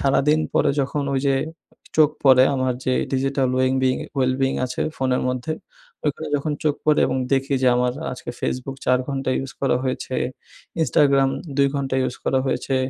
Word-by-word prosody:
সারাদিন 150 +3 +3
পরে 145 - +3
যখন 140 +2 -1
ওই 135 - +1
যে 135 - +3 0.6
চোখ 155 -1 +6
পড়ে 130 -1 +7
আমার 130 -1 0
যে 130 - +2 0.2
ডিজিটাল 135 0 +1
ওয়েং 130 0 +2
বিন 130 -1 +2 0.2
ওয়েল 130 -1 +2
বেইং 135 0 +2
আছে 125 - -3
ফোনের 130 -1 0
মধ্যে 125 +4 -2 0.5
ওইখানে 150 +2 -2
যখন 150 +2 -2
চোখ 150 -2 +2
পড়ে 150 - +4
এবং 130 - -1 0.2
দেখি 135 +1 +1
যে 130 - +5
আমার 125 0 +1 0.2
আজকে 125 - -7
ফেসবুক 130 +1 -3
৪ 125 0 +4
ঘন্টা 135 -1 -2
ইউজ 135 0 -5
করা 135 -3 +2
হয়েছে, 130 0 -3 0.7
ইনস্টাগ্রাম 140 -3 +3 0.3
২ 140 0 +4
ঘন্টা 135 -1 -2
ইউজ 125 - -2
করা 130 - +2
হয়েছে 135 0 -1
135 Hz, 175 wpm, -22 LUFS, 130-140 Hz, 0.7 s, পড়ে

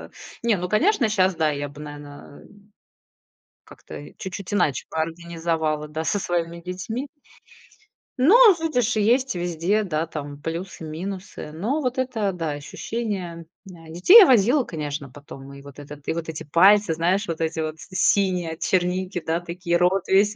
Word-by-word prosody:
А, - - -11 0.3
не, 230 -3 +2
ну, 180 0 -4
конечно, 265 - +2
щас, 190 -3 +2
да, 160 -2 +1
я 145 0 -3
бы, 145 +1 -13
наверно, 145 -1 -11 1.2
как-то - - -12
и - - -12
чуть-чуть 195 0 -6
иначе 155 -8 +1
бы - - -5
организовала, 165 -2 -2
да, 155 +2 -4
со 205 +5 0
своими 170 -1 -2
детьми. 185 +10 -5 1.1
Ну, 305 - +6 0.2
видишь, 245 -8 0
и - - +2
есть 255 +1 +2
везде, 175 +4 0
да, 165 -3 -2
там 145 -2 -7
плюсы, 165 +2 -5
минусы. 180 +1 -7
Но 225 - -2
вот 255 0 -2
это, 225 -6 -1
да, 165 -4 -3
ощущение 185 +5 -4
м 165 0 -11 0.4
на 160 - -14
детей 180 - +7
я - - +9
возила, 250 - +4
конечно, 150 -6 -5
потом. 140 -1 -12
И 140 - -11
вот 140 0 -13
этот 145 0 -11
и - - 0
вот 165 0 -5
эти 160 -1 -6
пальцы, 185 +4 +4
знаешь, 180 +5 0
вот 165 -1 -4
эти 160 0 -1
вот 155 0 -4
с - - -12
синие 185 -5 +2
от 160 - -12
черники, 180 0 0
да, 165 +2 -1
такие, 175 0 -2
рот 180 +2 +1
весь. 205 +2 +3
175 Hz, 175 wpm, -23 LUFS, 160-205 Hz, 1.2 s, я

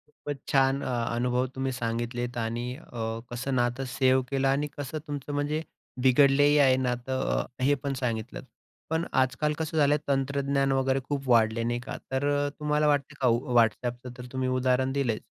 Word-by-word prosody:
खूपच 145 -1 -7
छान 135 -1 +3
अ, 125 - -2 0.2
अनुभव 125 +1 +1
तुम्ही 135 0 -1
सांगितलेत 120 0 -3
आणि 115 +1 -2
अ, 115 -6 -5
कसं 130 +2 -2
नातं 120 +2 0
सेव्ह 130 -1 +4
केलं 135 -1 +1
आणि 140 +2 +1
कसं 145 +1 -4
तुमचं 145 0 -5
म्हणजे 145 +2 -1 0.4
बिघडलेही 140 +3 +5
आहे 135 -2 +6
नातं 130 0 -1 0.2
अ, - - 0 0.2
हे 145 +2 +4
पण 140 -1 -4
सांगितलं. 115 -1 -3 0.5
पण 160 +1 0
आजकाल 130 +3 +1
कसं 160 0 -3
झालंय 145 -1 +4
तंत्रज्ञान 140 0 +1
वगैरे 135 0 +2
खूप 140 -2 -2
वाढलं 115 -1 +3
नाही 120 0 -1
का. 125 - -7
तर 135 +2 0
अ, 145 0 +1
तुम्हाला 150 0 +1
वाटतं 145 -2 +1
का 130 - +3 0.3
WhatsAppचं 120 +2 +1
तर 125 - -8
तुम्ही 130 -1 -1
उदाहरण 130 +1 +1
दिलंच 130 -5 -1
130 Hz, 170 wpm, -27 LUFS, 125-140 Hz, 0.5 s, आहे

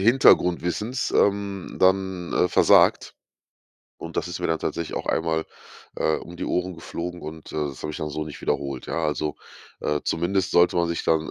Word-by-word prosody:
Hintergrundwissens, 105 0 +3
ähm, 100 -2 0
dann, 95 -1 +1
äh, 90 - +3
versagt. - - +4 0.8
Und 85 - -8
das 85 - 0
ist 90 0 -5
mir - - 0
dann 80 -1 +1
tatsächlich 85 -1 -3
auch - - -4
einmal, 80 -1 0 0.5
äh, 80 - +1
um 85 0 -9
die - - -4
Ohren 90 0 -1
geflogen 85 +1 -6
und, 80 +1 -9
äh, - - -5
das 70 - -9
habe 75 - -3
ich - - -6
dann 75 - -3
so 75 +1 -3
nicht 75 - -9
wiederholt, 70 -2 -2
ja 85 -1 -2
also, 75 0 -1 0.4
äh, 75 0 0
zumindest 90 +3 0
sollte 85 0 +4
man 85 -1 +2
sich 85 - -2
dann 80 -1 +1
85 Hz, 185 wpm, -24 LUFS, 80-90 Hz, 0.8 s, versagt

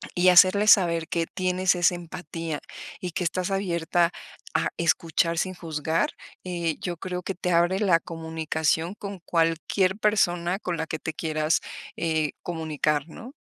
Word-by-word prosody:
y 180 0 +5
hacerle 185 +3 +6
saber 170 -6 +5
que 165 0 -1
tienes 185 0 +1
esa 175 0 +3
empatía, 165 -2 -6 0.4
y 180 - -4
que 180 - -2
estás 180 +2 -1
abierta 175 -3 +1 0.4
a - - +1
escuchar 170 0 +1
sin 185 +2 -1
juzgar, 160 -1 -1 0.3
eh, 170 -3 -2
yo 175 -2 -3
creo 180 +1 -5
que 195 - -4
te 180 0 -2
abre 175 +3 +3
la 185 -6 +4
comunicación 160 +1 -2
con 200 -2 -7
cualquier 170 +3 +1
persona 185 -4 +1
con 180 -4 -3
la 160 0 -3
que 155 - -4
te 160 - -4
quieras, 155 0 0 0.3
eh, 160 -2 0
comunicar, 155 -3 -1
¿no? 235 +10 -10
170 Hz, 150 wpm, -26 LUFS, 160-185 Hz, 0.4 s, hacerle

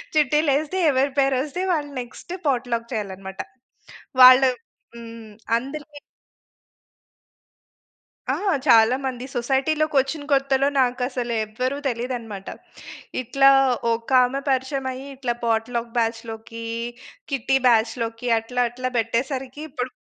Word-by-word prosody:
చిట్టీలు 300 0 +3
ఏ‌స్తే 310 +5 -3
ఎవరి 270 +1 +1
పేరు 270 -1 +3
వస్తే 300 +5 -5
వాళ్ళు 295 -3 -2
నెక్స్ట్ 245 +8 -10
పాట్‌లక్ 240 -3 -1
చేయాలనమాట. 195 -2 -5 0.8
వాళ్ళు 255 +1 +9 0.5
హ్మ్. 230 -2 -10 0.3
అందరికి 290 +4 -8 2.3
ఆ! - - +2 0.3
చాలా 230 0 +6
మంది 255 -1 -4
సొసైటీ‌లోకొచ్చిన 275 +3 0
కొత్తలో, 275 0 +2
నాకు 250 0 +1
అసలు 245 -2 -3
ఎవరు 250 +6 -3
తెలీదనమాట. 235 -5 -4 0.7
ఇట్లా 270 +3 +4 0.4
ఒక 230 0 -5
ఆమె 265 +3 -1
పరిచయం 265 0 -1
అయ్యి. 265 +2 -8
ఇట్లా 255 -2 -2
పాట్‌లక్ 230 +1 -1
బ్యాచ్‌లోకి, 225 0 -3 0.7
కిట్టీ 270 0 +1
బ్యాచ్‌లోకి 230 +1 +1
అట్లా 245 +2 -1
అట్లా 255 +1 -4
పెట్టేసరికి. 260 +5 -2
ఇప్పుడు 250 -2 -4
255 Hz, 105 wpm, -23 LUFS, 230-275 Hz, 2.3 s, వాళ్ళు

